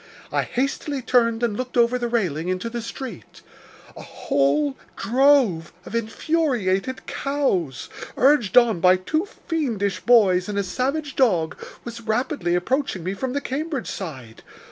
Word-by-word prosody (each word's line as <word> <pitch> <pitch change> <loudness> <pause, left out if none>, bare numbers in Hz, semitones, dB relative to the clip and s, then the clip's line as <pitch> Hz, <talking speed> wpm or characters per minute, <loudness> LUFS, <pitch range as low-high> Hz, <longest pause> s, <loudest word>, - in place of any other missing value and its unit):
I - - +1
hastily 275 +1 -2
turned 230 -2 +2
and 230 -3 +1
looked 250 +2 -4
over 240 +1 +3
the 240 - -1
railing 180 -9 -1
into 185 +5 -2
the 235 0 -3
street. 230 - -8 0.5
A - - -9
whole 140 0 0 0.2
drove 245 - +3
of - - -10
infuriated 230 - 0
cows, 195 - -1 0.3
urged 255 -5 +4
on 235 -7 +5
by 185 +1 +6
two 310 - -1
fiendish 245 - -2
boys 200 -6 +4
and 205 - -3
a 200 - +1
savage 275 +9 -2
dog, 180 -12 +2 0.3
was 235 0 -7
rapidly 220 - -1
approaching 195 - -1
me 185 +3 -2
from 250 +6 -3
the 285 - -1
Cambridge 285 0 -3
side. 130 - -7
230 Hz, 145 wpm, -23 LUFS, 185-265 Hz, 0.5 s, by